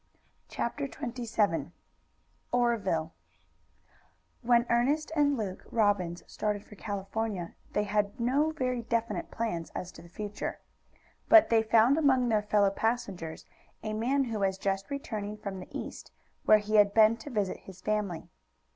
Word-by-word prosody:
CHAPTER 280 +4 -2
XXVII 225 - -1 0.8
OREVILLE 200 -10 +1 1.3
When 235 -1 +4
Ernest 285 +7 +1
and 285 -2 +3
Luke 195 -4 -4
Robbins 200 -6 +1
started 210 -1 -2
for - - -14
California, 200 -2 -4 0.2
they 210 - +2
had 205 +2 -1
no 270 +6 +2
very 255 -5 -1
definite 230 0 -2
plans 195 -8 -3
as 180 - -4
to - - -13
the 170 - -14
future. 205 +3 -5 0.7
But 330 -2 +8
they 225 -1 +5
found 230 +6 +4
among 260 -5 +3
their 215 -2 +3
fellow 205 -1 +3
passengers 200 -7 -2 0.4
a 215 0 -3
man 255 +6 +1
who 225 -4 -3
was 190 -1 +1
just 195 +2 -2
returning 215 -7 -4
from 200 -2 -6
the 180 - -9
East, - - -7 0.3
where 215 - +8
he 215 +1 0
had 205 -1 +5
been 220 0 +6
to 230 +6 -9
visit 205 -7 -1
his 190 -1 -11
family. 205 -4 -2
215 Hz, 145 wpm, -30 LUFS, 200-240 Hz, 1.3 s, But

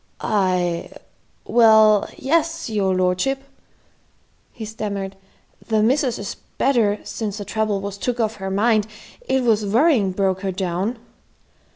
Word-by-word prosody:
"I 180 -4 0 0.6
well, 220 -3 +5
yes, 330 -2 0
your 195 -3 +1
lordship," 185 +10 0 1.1
he 225 - -8
stammered, 200 -3 -5 0.5
"the 220 -2 +2
missus 255 +1 +1
is 200 0 -6 0.2
better 230 -6 +2
since 210 -3 -4
the 205 - -6
trouble 210 -1 -1
was 200 0 -6
took 245 +2 -2
off 220 -1 0
her 190 -1 -4
mind. 215 +2 +2 0.4
It 265 -1 +1
was 220 -3 +2
worrying 225 - +3
broke 190 0 0
her 195 -1 -2
down." 190 +5 -2
210 Hz, 130 wpm, -21 LUFS, 195-235 Hz, 1.1 s, well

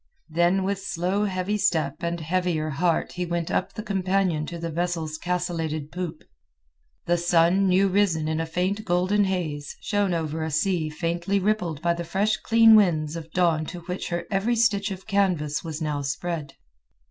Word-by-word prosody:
Then 175 +4 +2
with 195 0 -1
slow 195 +2 -1
heavy 190 +2 -1
step 175 -5 +1
and 170 0 -2
heavier 165 -1 -1
heart 165 +4 0
he 180 - -3
went 170 -1 -2
up - - 0
the 215 - -6
companion 190 -6 0
to 170 - -6
the 165 0 -4
vessel's 165 -2 -2
castellated 165 -4 -2
poop. 175 -3 -5 0.8
The 175 0 +2
sun, 175 +3 +3
new 190 +2 +4
risen 185 -5 +1
in 160 0 -1
a 165 - -2
faint 185 +5 -1
golden 190 +2 +2
haze, 155 -7 -3
shone 205 -4 0
over 160 -1 -2
a 160 - -2
sea 160 +1 0
faintly 170 +5 -1
rippled 180 -7 -1
by 170 0 +3
the 170 0 -4
fresh 195 +6 0
clean 225 -1 +6
winds 165 -7 +3
of 165 -1 -7
dawn 170 -3 +2
to 175 - -7
which 180 +2 -5
their 170 -1 -2
every 210 +5 +1
stitch 210 -3 +2
of 190 -1 -7
canvas 180 -8 0
was 160 -1 -5
now 150 -2 -1
spread. 145 +1 -4
175 Hz, 175 wpm, -25 LUFS, 160-195 Hz, 0.8 s, clean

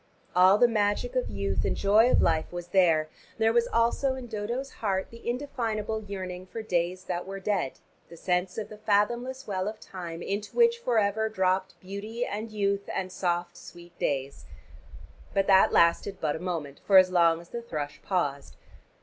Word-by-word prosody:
All 185 +2 +6
the 245 - +6
magic 215 +2 0
of 255 - 0
youth 100 -1 -2
and - - 0
joy 215 +4 +5
of - - +4
life 160 -1 +1
was 175 0 -6
there: 165 -5 +3 0.3
there 225 0 +3
was 235 0 +3
also 235 +4 +1
in 260 -1 -7
Dodo's 235 +4 -4
heart 190 -3 -1
the 230 0 -7
indefinable 225 -5 -2
yearning 185 -2 -6
for 225 +4 -6
days 180 -1 -1
that 175 0 -4
were 195 0 -5
dead, 190 -8 -1 0.4
the 170 - -12
sense 180 +1 -1
of 215 -1 -4
the 215 -1 -11
fathomless 235 +5 0
well 190 -1 -2
of 215 0 -5
time 175 -3 -7
into 205 +1 -4
which 470 0 +4
forever 220 - +1
dropped 190 -2 0
beauty 210 +5 -5
and 215 +2 -4
youth 200 -1 -1
and 185 -1 -3
the - - -11
soft 175 -1 -1
sweet 175 0 -13
days. 140 -1 -2 0.9
But 195 0 +3
that 190 -1 +5
lasted 170 +4 +3
but 150 -2 -1
a - - -5
moment, 160 -6 -4
for 195 - +6
as 185 -1 +7
long 170 -2 +4
as 170 - -14
the 235 - -5
thrush 150 -10 -5
paused. 145 -7 -2
195 Hz, 185 wpm, -28 LUFS, 175-220 Hz, 0.9 s, as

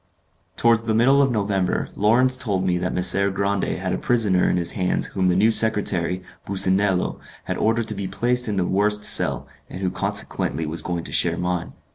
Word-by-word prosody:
Towards 115 -1 +2
the 110 -1 0
middle 135 +5 +4
of 135 - +2
November, 100 -4 -1
Lawrence 125 +5 +3
told 100 -8 -2
me 90 -1 0
that 90 +1 -3
Messer 95 +2 +2
Grande 100 0 -2
had 95 0 -3
a - - -3
prisoner 105 -7 +1
in - - 0
his 85 -1 -2
hands 90 -2 -1
whom 95 -1 -2
the 90 - +1
new 105 +4 +3
secretary, 95 -5 +2 0.2
Businello, 95 -1 +1 0.2
had - - -4
ordered 115 +1 0
to - - -2
be 100 -1 -5
placed 125 +3 0
in 105 - -2
the 90 - 0
worst 105 +3 +1
cell, - - +2 0.2
and 95 - -8
who 95 -2 -1
consequently 80 -2 -2
was 80 +2 -3
going 85 -2 -4
to - - -7
share - - +1
mine. 90 -1 -3
100 Hz, 195 wpm, -21 LUFS, 90-110 Hz, 0.2 s, middle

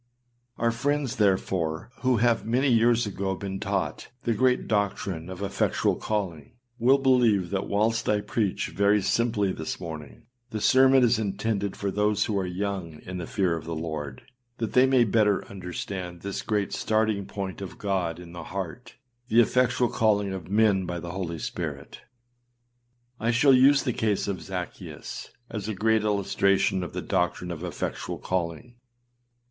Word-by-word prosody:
Our 115 0 +2
friends, 140 +2 -1
therefore, 95 -3 0
who 130 -2 +2
have 115 0 +2
many 125 +5 +1
years 120 0 +4
ago 95 -1 -2
been 95 0 -5
taught 100 -2 -2 0.2
the 120 - +1
great 125 +3 +2
doctrine 95 -5 -1
of 95 +1 -6
effectual 100 0 +1
calling, 90 -9 -3 0.3
will 130 +4 +5
believe 120 -9 +3
that 100 -1 -1
whilst 115 +3 +1
I 105 -1 +2
preach 105 -1 -1
very 100 +1 +3
simply 110 -4 +1
this 80 -3 -5
morning, 80 +4 -8 0.3
the 110 - -4
sermon 130 +3 +5
is 120 -1 +3
intended 100 -1 -1
for 100 -1 -2
those 105 +1 +1
who 110 - -2
are 95 - -2
young 90 -4 -4
in 90 0 -6
the 85 - -5
fear 95 -4 +1
of 80 - -7
the 85 0 -4
Lord, 80 -3 -5 0.3
that 115 -2 -3
they 130 +1 +6
may 130 -2 +5
better 105 -2 +2
understand 90 -1 -6
this 100 0 -4
great 105 -2 -1
starting 110 -2 0
point 100 -2 -5
of 95 - -7
God 95 -5 -1
in 90 -1 -11
the 85 -1 -8
heart, 100 +6 -6 0.3
the 115 - +4
effectual 125 +1 +3
calling 105 -4 +1
of 90 -2 -7
men 100 -3 +3
by 85 0 -3
the 85 +1 -6
Holy 90 -3 -4
Spirit. - - -5 1.2
I 115 - 0
shall 125 +4 +5
use 135 +2 +6
the 125 - 0
case 105 -3 0
of 100 -2 -3
Zaccheus 90 -3 -6 0.2
as 105 -2 -4
a 110 - -2
great 110 +2 +2
illustration 100 -2 +2
of 90 - -6
the - - -4
doctrine 90 0 -1
of 85 0 -6
effectual 90 -3 -4
calling. 90 +7 -3
100 Hz, 165 wpm, -26 LUFS, 90-115 Hz, 1.2 s, they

